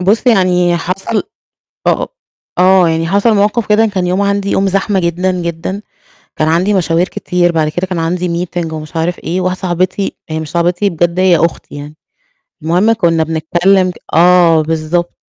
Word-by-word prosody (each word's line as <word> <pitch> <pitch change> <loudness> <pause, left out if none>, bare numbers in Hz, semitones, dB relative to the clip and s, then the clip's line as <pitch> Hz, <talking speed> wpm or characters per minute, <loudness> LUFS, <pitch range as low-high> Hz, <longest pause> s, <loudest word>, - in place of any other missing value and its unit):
بُصّ 205 +7 +1
يعني 180 -6 +3
حصل 190 +6 -2 0.7
أ - - +5
أ - - -1 0.5
آه، 185 -2 +5
يعني 165 0 -1
حصل 200 +5 +2
مواقف 210 +3 +1
كده 215 +1 +3
كان 190 -4 -2
يوم 185 +2 0
عندي 200 0 0
يوم 195 0 +1
زحمة 195 +1 0
جدًا، 180 +2 0
جدًا، 170 +4 -4 0.6
كان 155 - 0
عندي 180 +6 +1
مشاوير 175 -1 +1
كتير 175 -1 -1
بعد 160 -2 +1
كده 175 +5 -3
كان 180 -2 -4
عندي 175 +1 -2
meeting 170 -2 -4
ومش 155 +1 -8
عارف 170 +2 -1
إيه، 175 +4 -3
واحدة 185 0 -1
صاحبتي 185 +2 -1
هي 160 0 -3
مش 155 -2 -7
صاحبتي 175 +4 0
بجد 175 +1 0
هي 185 -2 +4
أختي 165 +1 -2
يعني، 145 +1 -9 0.7
المهم 180 +8 +2
كنا 170 -7 +1
بنتكلم 175 +4 +1
ك - - -9 0.2
آه 170 -1 +5
بالضبط، 160 +2 -2
180 Hz, 175 wpm, -14 LUFS, 165-190 Hz, 0.7 s, أ